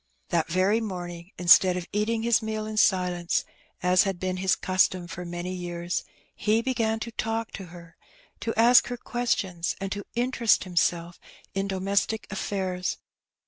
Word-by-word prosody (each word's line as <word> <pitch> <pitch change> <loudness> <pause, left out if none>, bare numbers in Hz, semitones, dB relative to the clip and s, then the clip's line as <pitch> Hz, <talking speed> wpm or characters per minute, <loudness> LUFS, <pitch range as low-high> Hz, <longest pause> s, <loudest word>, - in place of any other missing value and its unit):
That 165 -1 0
very 190 +6 +2
morning, 175 -4 -6
instead 180 +1 +6
of 180 - -4
eating 220 +2 0
his 235 -1 +3
meal 220 -1 -3
in 215 0 -5
silence, 180 -4 +2 0.4
as 180 +1 +5
had 195 -3 -1
been 185 0 -2
his 185 0 +2
custom 185 -1 +1
for 175 +1 -7
many 175 +1 -4
years, 175 -1 -3 0.3
he 220 +2 +1
began 225 -4 0
to 235 - -4
talk 225 0 -2
to 195 - -7
her, 170 -1 -13 0.4
to 230 - -2
ask 240 +2 +7
her 245 - -4
ques 240 0 0
tions, 175 -4 -3
and 195 0 -4
to 205 0 -3
interest 240 -2 +2
himself 175 -1 0 0.3
in 195 0 -1
domestic 200 +3 0
affairs. 190 -2 -2
190 Hz, 160 wpm, -26 LUFS, 175-220 Hz, 0.4 s, ask